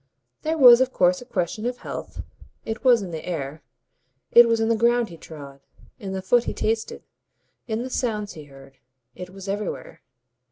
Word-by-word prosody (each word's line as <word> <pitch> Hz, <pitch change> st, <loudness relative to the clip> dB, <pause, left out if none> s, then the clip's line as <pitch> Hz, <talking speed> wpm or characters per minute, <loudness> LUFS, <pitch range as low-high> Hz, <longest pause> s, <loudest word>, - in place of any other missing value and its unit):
There 320 Hz, +1 st, -1 dB
was 250 Hz, -3 st, +8 dB
of 260 Hz, 0 st, +1 dB
course 180 Hz, -1 st, +2 dB
a -, -, -11 dB
question 215 Hz, 0 st, -3 dB
of 250 Hz, 0 st, -3 dB
health -, -, -7 dB, 0.4 s
it 220 Hz, 0 st, -5 dB
was 245 Hz, -5 st, +5 dB
in 180 Hz, -, -7 dB
the 160 Hz, -1 st, -6 dB
air, 155 Hz, -3 st, -5 dB, 0.7 s
it 240 Hz, 0 st, +8 dB
was 230 Hz, -1 st, +1 dB
in 225 Hz, -, +1 dB
the 230 Hz, -, +2 dB
ground 235 Hz, +1 st, +2 dB
he 170 Hz, -, -10 dB
trod, 140 Hz, -4 st, -11 dB, 0.4 s
in 195 Hz, -2 st, -6 dB
the 190 Hz, -1 st, -4 dB
food 240 Hz, +5 st, +3 dB
he -, -, -4 dB
tasted, 220 Hz, 0 st, -2 dB, 0.6 s
in 225 Hz, +1 st, -2 dB
the 260 Hz, -, -6 dB
sounds 210 Hz, -5 st, -2 dB
he 155 Hz, -2 st, -11 dB
heard, 135 Hz, -1 st, -16 dB, 0.4 s
it 180 Hz, +5 st, -9 dB
was 195 Hz, +1 st, -11 dB
everywhere. 205 Hz, 0 st, -5 dB
210 Hz, 190 wpm, -23 LUFS, 175-235 Hz, 0.7 s, was